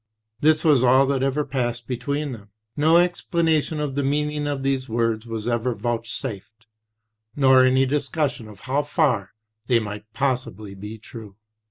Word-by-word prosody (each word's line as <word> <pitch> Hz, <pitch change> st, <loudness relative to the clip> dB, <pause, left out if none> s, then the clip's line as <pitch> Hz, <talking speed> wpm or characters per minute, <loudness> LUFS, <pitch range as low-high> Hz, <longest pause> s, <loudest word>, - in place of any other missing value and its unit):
This 155 Hz, +2 st, +3 dB
was 145 Hz, -5 st, +5 dB
all 130 Hz, +2 st, +5 dB
that 135 Hz, -1 st, 0 dB
ever 135 Hz, +2 st, 0 dB
passed 120 Hz, -3 st, -2 dB
between 140 Hz, +4 st, -2 dB
them; 105 Hz, -4 st, -10 dB, 0.3 s
no 160 Hz, +3 st, +4 dB
explanation 165 Hz, -3 st, +1 dB
of 145 Hz, -2 st, -2 dB
the 140 Hz, -, 0 dB
meaning 150 Hz, +1 st, -1 dB
of 140 Hz, -2 st, -3 dB
these 135 Hz, -1 st, -1 dB
words 115 Hz, 0 st, -1 dB
was 115 Hz, -1 st, -4 dB
ever 120 Hz, 0 st, 0 dB
vouch 115 Hz, +2 st, -3 dB
safed, 110 Hz, -2 st, -6 dB, 0.7 s
nor 130 Hz, -2 st, +6 dB
any 130 Hz, +1 st, +4 dB
discussion 140 Hz, -3 st, -1 dB
of 105 Hz, -2 st, -14 dB
how 135 Hz, +4 st, 0 dB
far 140 Hz, -, 0 dB, 0.3 s
they 120 Hz, -, +4 dB
might 105 Hz, -1 st, -5 dB
possibly 120 Hz, -6 st, -2 dB
be 105 Hz, +3 st, -8 dB
true. 110 Hz, -2 st, -11 dB
130 Hz, 160 wpm, -23 LUFS, 115-145 Hz, 0.7 s, nor